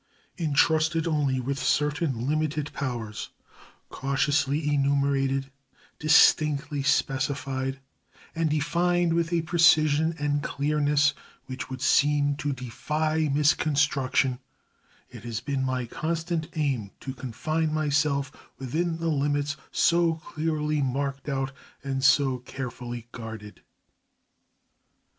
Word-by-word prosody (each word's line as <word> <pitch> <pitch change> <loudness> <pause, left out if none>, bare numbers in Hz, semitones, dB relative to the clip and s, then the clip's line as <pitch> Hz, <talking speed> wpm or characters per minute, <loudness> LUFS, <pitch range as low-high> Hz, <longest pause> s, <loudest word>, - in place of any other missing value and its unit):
Intrusted 160 0 +2
only 145 -5 +1
with 135 +2 -3
certain 145 -5 0
limited 155 -1 -1
powers, 120 -6 -4 0.6
cautiously 145 +2 0
enumerated, 135 -1 +1 0.5
distinctly 150 -1 +4
specified, 135 -1 -1 0.5
and 165 -1 0
defined 170 +3 +1
with 170 0 0
a 170 -2 +1
precision 160 -2 +4
and 145 -1 0
clearness 145 0 +1 0.3
which 130 -1 -6
would 130 0 -6
seem 145 0 +3
to 145 -1 -2
defy 150 +5 -1
misconstruction, 140 -3 +2 0.7
it 120 -3 -11
has 115 -2 -4
been 135 +1 -2
my 130 -1 -1
constant 165 +4 -3
aim 135 -9 -1
to 130 - -6
confine 155 +6 -2
myself 145 -2 +1 0.3
within 160 +6 -2
the 165 0 -3
limits 145 0 0 0.2
so 170 -1 +3
clearly 155 -1 -2
marked 140 +2 -2
out 135 -1 -1 0.3
and 135 -1 -2
so 135 -1 +4
carefully 120 -2 -7
guarded. 110 -3 -9
145 Hz, 100 wpm, -26 LUFS, 135-155 Hz, 0.7 s, distinctly